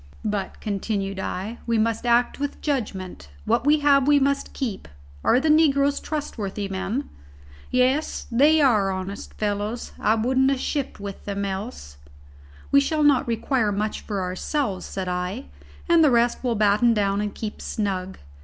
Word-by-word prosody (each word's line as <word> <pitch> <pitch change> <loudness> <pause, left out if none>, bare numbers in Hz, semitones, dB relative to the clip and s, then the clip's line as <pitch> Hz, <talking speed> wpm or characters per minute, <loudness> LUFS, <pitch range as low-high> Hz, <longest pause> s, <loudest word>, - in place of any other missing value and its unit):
"But," 205 -3 -3
continued 195 -1 -2
I, 200 +5 -4
"we 230 -1 +2
must 225 +2 0
act 240 +2 +2
with 285 0 -3
judgment. 195 - -3 0.2
What 275 - +1
we 300 0 +4
have 280 -2 +4
we 290 -1 +6
must 280 0 0
keep. 230 -8 -4 0.4
Are 245 - +4
the 310 - -1
negroes 285 -2 +4
trustworthy 210 -10 -4
men?" 195 +8 -3 0.6
"Yes, 255 +4 +1
they 295 +6 +5
are 215 -8 +4
honest 190 +1 -5
fellows. 210 +2 -3
I 215 - +3
wouldn't 260 +4 +2
have 275 -2 0
shipped 280 -3 -3
with 200 -1 -7
them 200 0 -2
else." 190 - -6 0.7
"We 280 - +7
shall 305 +2 0
not 285 -4 +4
require 230 -1 0
much 210 +2 -2
for 200 -3 -3
ourselves," 190 +3 -2
said 190 -1 -4
I, 180 +7 -3 0.4
"and 340 -2 +5
the 300 - +6
rest 235 -1 +2
we'll 245 -3 0
batten 215 +3 +3
down 200 -1 +1
and 210 0 -2
keep 215 -2 -6
snug. 190 -3 -3
225 Hz, 160 wpm, -24 LUFS, 200-275 Hz, 0.7 s, We